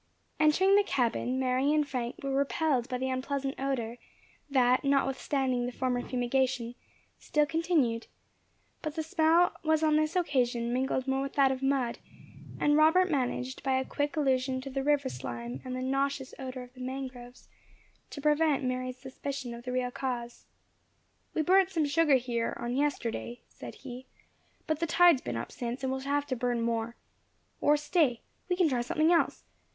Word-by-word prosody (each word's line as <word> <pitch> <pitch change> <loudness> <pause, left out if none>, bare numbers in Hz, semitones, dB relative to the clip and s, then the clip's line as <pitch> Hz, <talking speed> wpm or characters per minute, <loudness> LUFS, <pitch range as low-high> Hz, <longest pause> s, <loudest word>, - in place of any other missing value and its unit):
Entering 365 +6 +4
the 410 - +5
cabin, 255 - 0
Mary 260 +2 +2
and 300 -1 +2
Frank 250 -3 -4
were 275 0 -2
repelled 280 -2 +1
by 250 - -1
the 260 +1 -2
unpleasant 270 +1 -2
odour 250 -4 -2 0.5
that, 255 -2 +3
notwithstanding 270 -2 +1
the - - -3
former 250 0 -1
fumigation, 250 -1 -1 0.5
still 300 0 +1
continued; 315 -8 0 0.7
but 310 -2 -4
the 320 - -2
smell 325 +2 +3
was 315 0 +2
on 305 -1 +4
this 310 +2 0
occasion 245 -8 +1
mingled 260 +1 -1
more 265 0 +1
with 275 0 -4
that 275 -2 +4
of 260 0 -3
mud, 270 -3 0 0.6
and 295 0 +3
Robert 340 +4 +5
managed 260 -2 -1
by 265 -1 +1
a 260 - -1
quick 290 +2 -2
allusion 260 -2 +1
to 270 +1 -7
the 270 +1 -2
river 285 -1 +2
slime, 120 0 -6
and 255 0 -5
the 255 - -3
nauseous 275 0 -1
odour 255 -1 -6
of 250 0 -15
the 255 - -12
mangroves, 255 -1 -7 0.6
to - - -8
prevent 300 -1 +2
Mary's 255 0 -2
suspicion 265 -1 -6
of 235 +1 -10
the 250 - -3
real 250 0 -1
cause. 245 -2 -5 0.9
"We 315 - +2
burnt 375 +3 +4
some 330 -5 0
sugar 295 0 +4
here, 240 -2 -1
on 240 +1 -3
yesterday," 245 -4 -2
said - - -10
he, 255 -1 -9 0.6
"but 310 -1 -1
the 335 - 0
tide 350 +2 +6
has - - -12
been 115 - -4
up 115 - -5
since, 240 +2 -5
and 265 0 0
we 265 - -2
shall 275 +1 -4
have 290 0 +1
to 270 -3 -2
burn 245 -1 -1
more. 230 0 -1 0.6
Or 295 +1 +4
stay 295 -5 +1 0.3
we 360 - +2
can 355 -2 +3
try 255 -5 0
something 310 +7 +2
else. 335 - +2
265 Hz, 180 wpm, -30 LUFS, 250-295 Hz, 0.9 s, tide